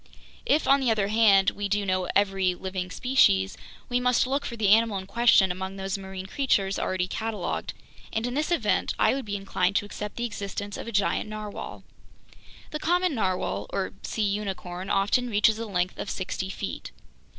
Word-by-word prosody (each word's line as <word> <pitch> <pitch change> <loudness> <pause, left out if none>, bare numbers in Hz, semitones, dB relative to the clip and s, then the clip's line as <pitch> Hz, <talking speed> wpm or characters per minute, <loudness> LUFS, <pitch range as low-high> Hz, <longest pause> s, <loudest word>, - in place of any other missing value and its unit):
"If, 300 - +2
on 275 +1 +6
the 260 -3 +1
other 210 -3 +1
hand, 205 -3 +5
we 205 0 -4
do 205 0 0
know 185 -1 0
every 195 -2 +2
living 185 0 -4
species, 140 - +3 0.3
we 245 0 +1
must 250 0 +3
look 275 +2 -1
for 235 - -5
the 210 -3 +2
animal 220 0 +4
in 190 - -6
question 200 -2 +4
among 190 +1 -5
those 195 0 -3
marine 190 -1 -7
creatures 195 -4 0
already 185 -1 -1
cataloged, 220 +2 -3 0.4
and 220 +1 -1
in 245 - -2
this 300 +4 -1
event 345 - +1
I - - +4
would 270 -2 -3
be 205 -1 -3
inclined 195 -1 0
to 205 - +2
accept 210 0 -6
the 240 - -2
existence 205 -2 -5
of - - -7
a - - -4
giant 205 0 0
narwhale. 215 -1 -7 0.9
"The 305 - -3
common 355 +1 +2
narwhale, 185 - -1
or 195 -1 -2
sea 220 - -2
unicorn, 195 -3 -3
often 210 +6 +2
reaches 215 +1 +3
a 230 - -4
length 180 -2 -1
of - - -4
sixty 190 0 -3
feet. - - -5
205 Hz, 185 wpm, -26 LUFS, 190-230 Hz, 0.9 s, on